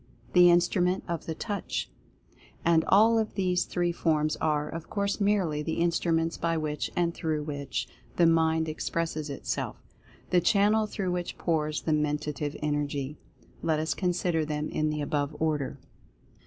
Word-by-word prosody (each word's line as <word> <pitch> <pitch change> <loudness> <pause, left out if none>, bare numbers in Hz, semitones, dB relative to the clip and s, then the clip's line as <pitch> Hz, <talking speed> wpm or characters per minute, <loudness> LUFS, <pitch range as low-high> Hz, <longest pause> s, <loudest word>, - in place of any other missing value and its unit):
The 180 -1 +8
Instrument 175 +2 +3
of 170 -2 -4
the 160 - -3
Touch; 205 +3 -3 0.7
and 165 -1 +4
all 225 +3 +5
of 220 - -2
these 180 -2 +1
three 175 -1 0
forms 155 -3 +1
are, 150 -1 0
of 165 +1 -7
course, 200 0 -1
merely 190 -7 +2
the 160 +1 -2
Instruments 170 -1 +1
by 165 0 0
which, 150 -1 -2
and 170 -1 +1
through 155 -3 -2
which, 140 -4 -3 0.3
the 175 - +4
Mind 160 -1 +3
expresses 155 -1 -2
itself 140 - -3 0.3
— - - -27
the 180 - +4
channel 210 +4 +3
through 195 -3 -2
which 180 -1 -3
pours 155 -2 0
the 160 - 0
Mentative 150 -1 -1
Energy. 145 -1 -2 0.4
Let 160 -2 +1
us 160 +1 0
consider 175 -3 0
them 150 0 -3
in 155 0 0
the 150 0 -2
above 145 0 -1
order. 150 -4 -1
160 Hz, 155 wpm, -28 LUFS, 150-175 Hz, 0.7 s, The